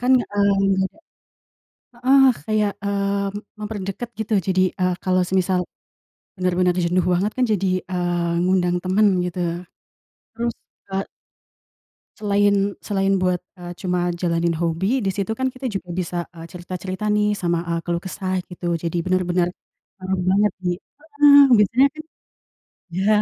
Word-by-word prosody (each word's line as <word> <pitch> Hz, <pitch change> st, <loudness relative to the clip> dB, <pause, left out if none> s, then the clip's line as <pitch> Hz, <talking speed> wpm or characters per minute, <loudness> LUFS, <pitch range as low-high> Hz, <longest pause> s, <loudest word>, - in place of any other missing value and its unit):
Kan, 250 Hz, +1 st, +3 dB
eee 200 Hz, -2 st, +1 dB, 1.5 s
heeh, 270 Hz, +1 st, +6 dB, 0.2 s
kayak, 210 Hz, -2 st, +1 dB
eee, 200 Hz, 0 st, 0 dB, 0.3 s
memperdekat, 210 Hz, +2 st, -5 dB
gitu. 220 Hz, 0 st, -1 dB
Jadi, 185 Hz, 0 st, +3 dB, 0.2 s
eee, 180 Hz, 0 st, +2 dB
kalau 185 Hz, -1 st, +2 dB
semisal 185 Hz, -1 st, +1 dB, 0.8 s
bener-bener 180 Hz, 0 st, +2 dB
jenuh 175 Hz, +1 st, +1 dB
banget 195 Hz, +4 st, +1 dB
kan, 255 Hz, -, +2 dB
jadi 195 Hz, -1 st, 0 dB, 0.2 s
,eee, 175 Hz, -1 st, -1 dB
ngundang 180 Hz, -1 st, +2 dB
temen 195 Hz, +3 st, +3 dB, 0.2 s
gitu, 180 Hz, +1 st, -5 dB, 1.0 s
terus, 235 Hz, 0 st, -2 dB, 0.4 s
eee 195 Hz, 0 st, -1 dB, 1.1 s
Selain 205 Hz, -1 st, +2 dB
selain 195 Hz, -1 st, 0 dB
buat, 180 Hz, -1 st, +1 dB, 0.2 s
eee, 175 Hz, 0 st, -7 dB
cuma 180 Hz, -1 st, 0 dB
jalanin 170 Hz, -1 st, 0 dB
hobi, 190 Hz, +9 st, 0 dB
di 195 Hz, -, +1 dB
situ 200 Hz, +3 st, -2 dB
kan 260 Hz, 0 st, +1 dB
kita 260 Hz, 0 st, -6 dB
juga 195 Hz, -4 st, -5 dB
bisa, 180 Hz, 0 st, -3 dB, 0.2 s
eee, 165 Hz, 0 st, -9 dB
cerita-cerita 185 Hz, +2 st, -6 dB
nih, 210 Hz, 0 st, +2 dB
sama, 170 Hz, -2 st, 0 dB
eee, 170 Hz, 0 st, 0 dB
keluh 170 Hz, -1 st, -1 dB
kesah, 185 Hz, 0 st, -3 dB
gitu. 175 Hz, -1 st, -5 dB
Jadi, 170 Hz, 0 st, -3 dB
bener-bener 180 Hz, -1 st, +1 dB, 0.5 s
ngaruh 185 Hz, 0 st, -1 dB
banget 205 Hz, 0 st, +3 dB
di 180 Hz, -, -1 dB
heeh, 290 Hz, 0 st, +3 dB, 0.2 s
biasanya 240 Hz, +7 st, +4 dB
kan 310 Hz, -, -8 dB, 0.9 s
ya 195 Hz, +3 st, +1 dB
190 Hz, 135 wpm, -22 LUFS, 180-210 Hz, 1.5 s, heeh